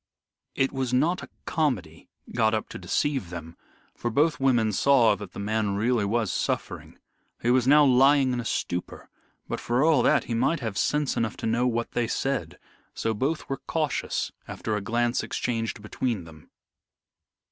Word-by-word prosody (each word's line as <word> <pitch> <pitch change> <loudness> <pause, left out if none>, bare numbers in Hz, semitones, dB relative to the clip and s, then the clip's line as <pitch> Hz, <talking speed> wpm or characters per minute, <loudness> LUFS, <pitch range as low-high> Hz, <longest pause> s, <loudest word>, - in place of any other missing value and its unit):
It 135 - +1
was 130 -2 -2
not 155 +8 +2
a - - -10 0.2
comedy 100 - -2 0.2
got 110 -2 +2
up 110 - -3
to - - -8
deceive 135 - -1
them, 85 -1 -8 0.4
for 120 - -3
both 150 +7 +2
women 120 -5 +3
saw 120 +1 +4
that 100 -2 -9
the - - -7
man 105 0 -1
really 110 +1 +1
was 110 -1 0
suffering. - - -3 0.5
He 120 - +3
was 125 0 +3
now 150 +1 +7
lying 135 0 +5
in 125 - -1
a 120 - -4
stupor, 90 -5 -4 0.4
but, - - -3
for 120 +3 +1
all 155 -6 +4
that, - - +3
he 120 - -4
might 130 +8 +1
have 110 -6 -4
sense 150 +6 +1
enough 115 -2 -1
to - - -5
know 120 +3 +2
what 115 -1 -1
they 120 -1 0
said, 135 +3 -2 0.4
so 115 - -1
both 135 +9 -2
were 135 - -2
cautious 155 -3 -1 0.2
after 110 - -3
a 105 - -2
glance 120 +3 0
exchanged 115 -2 -3
between 110 -2 -2
them. 80 -2 -15
120 Hz, 175 wpm, -26 LUFS, 110-135 Hz, 0.5 s, now